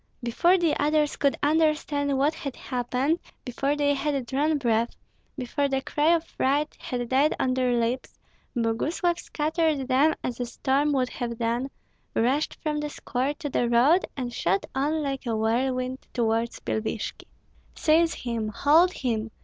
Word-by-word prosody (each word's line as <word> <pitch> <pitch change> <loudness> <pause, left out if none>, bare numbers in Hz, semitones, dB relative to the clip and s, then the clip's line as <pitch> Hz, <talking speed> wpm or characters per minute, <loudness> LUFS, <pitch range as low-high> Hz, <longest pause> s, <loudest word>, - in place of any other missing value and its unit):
Before 345 +10 +3
the 335 -4 +2
others 300 0 +2
could 280 -1 +1
understand 295 -2 +2
what 285 +4 +2
had 275 -4 -6
happened, 255 +5 -1 0.3
before 275 +3 -1
they 290 -1 +2
had 280 -2 -1
drawn 295 +5 +1
breath, 235 -3 0 0.4
before 280 +3 -1
the 270 -1 -1
cry 300 +4 +2
of 325 - -1
fright 290 +2 0
had 245 -2 -3
died 275 +4 +3
on 255 - +1
their 250 -1 +1
lips, 240 +3 -2 0.4
Boguslav 295 +10 0
scattered 310 -3 -1
them 280 +4 +3
as 250 -1 -3
a 245 - -2
storm 275 +4 +1
would 255 -2 +1
have 235 -2 -4
done, 235 +3 -1 0.5
rushed 265 +6 +1
from 300 -1 -1
the 295 0 -3
square 270 0 -2
to 300 -1 -5
the 240 - +1
road, 265 +10 +4
and 245 -2 -3
shot 195 -2 0
on 300 +3 0
like 270 -2 -3
a 230 - 0
whirlwind 255 +3 0 0.2
toward 230 -1 +1 0.2
Pilvishki. 220 0 -3 0.5
"Seize 325 +1 +3
him! 230 -3 -3
Hold 305 +11 +4
him! 225 -4 -2
270 Hz, 155 wpm, -26 LUFS, 245-300 Hz, 0.5 s, road